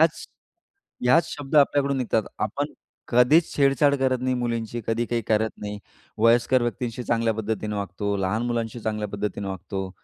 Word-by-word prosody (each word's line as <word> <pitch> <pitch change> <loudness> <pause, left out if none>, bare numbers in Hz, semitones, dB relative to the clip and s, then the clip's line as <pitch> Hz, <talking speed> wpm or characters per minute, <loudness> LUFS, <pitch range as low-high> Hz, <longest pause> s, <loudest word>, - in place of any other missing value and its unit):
याच 160 0 +2 0.8
याच 145 +8 +5
शब्द 145 +1 -5
आपल्याकडून 140 -1 +3
निघतात. 115 -3 +1 0.2
आपण 140 +8 -2 0.3
कधीच 125 +7 +4
छेडछाड 140 +1 +4
करत 130 -1 +1
नाही 130 0 0
मुलींची, 115 -1 -2
कधी 115 +1 0
काही 120 -1 -1
करत 110 0 +2
नाही. 105 0 -5 0.4
वयस्कर 120 +3 +4
व्यक्तींशी 120 0 -3
चांगल्या 115 -1 +1
पद्धतीने 110 -1 -3
वागतो, 100 +1 -2
लहान 95 +4 -1
मुलांशी 115 0 -2
चांगल्या 105 -1 -2
पद्धतीने 100 -1 -3
वागतो. 95 0 -5
115 Hz, 150 wpm, -25 LUFS, 105-130 Hz, 0.8 s, याच